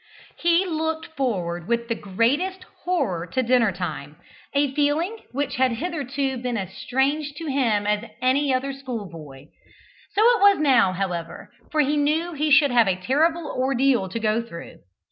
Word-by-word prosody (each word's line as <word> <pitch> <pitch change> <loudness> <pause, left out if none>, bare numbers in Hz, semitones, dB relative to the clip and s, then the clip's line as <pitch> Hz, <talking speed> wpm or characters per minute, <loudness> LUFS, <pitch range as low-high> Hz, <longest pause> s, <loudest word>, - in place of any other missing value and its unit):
He 345 +2 +3
looked 320 -1 -3
forward 175 -10 -2
with 235 0 0
the 230 - 0
greatest 275 - -1 0.2
horror 230 - -1
to 255 +9 -1
dinner 235 -3 +3
time 155 -5 -5 0.4
a 280 -1 +1
feeling 305 +9 0
which 280 +2 -2
had 255 -1 +2
hitherto 275 -2 -3
been 245 -1 -2
as 190 -2 -5
strange 280 +5 -1
to 325 - -7
him 245 -8 +1
as 210 0 +1
to 230 - -11
any 265 +3 +2
other 265 +2 -1
schoolboy. 170 - -8 0.7
So 415 - +3
it 475 -1 +4
was 405 0 +6
now, 260 -10 +4
however, 175 -3 -4 0.2
for 310 - +3
he 295 +1 +1
knew 315 +4 0
he 305 0 -1
should 295 -1 +5
have 235 -3 +4
a 190 - +2
terrible 310 - +1
ordeal 260 -6 +1
to 230 - -4
go 220 +1 +1
through. 230 -8 -10
260 Hz, 165 wpm, -23 LUFS, 210-300 Hz, 0.7 s, was